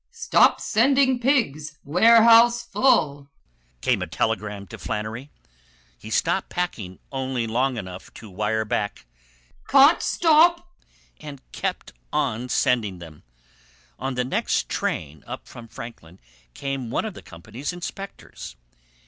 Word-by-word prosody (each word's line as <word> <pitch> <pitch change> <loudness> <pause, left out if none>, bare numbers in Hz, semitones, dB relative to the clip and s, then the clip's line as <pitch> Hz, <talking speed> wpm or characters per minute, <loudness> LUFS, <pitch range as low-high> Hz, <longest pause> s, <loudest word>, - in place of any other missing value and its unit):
"Stop 465 -1 +3
sending 260 +2 +2
pigs. 155 - 0
Warehouse 230 +7 +6
full," 145 - +1 0.5
came - - +1
a - - -3
telegram 105 0 -2
to 90 - -11
Flannery. 110 +6 -5 0.7
He - - -12
stopped - - 0
packing 110 - -4
only 130 -3 -2
long 125 +3 0
enough 95 -3 -8
to 110 - -11
wire 105 +3 -2
back, 105 - -3 0.6
"Can't 280 +4 +6
stop," 340 +2 +3 0.5
and 145 -3 -9
kept - - -4 0.2
on 120 +4 -1
sending 110 -7 +1
them. 80 -3 -12 0.8
On 135 -1 -3
the 125 0 -1
next 130 - -1
train 75 -1 -3
up - - -8
from 115 -1 -11
Franklin 95 -7 -11 0.4
came 135 -3 -4
one 125 - -1
of 215 - -5
the - - -11
company's 110 - -7
inspectors. 180 - -8
135 Hz, 125 wpm, -23 LUFS, -, 0.8 s, Warehouse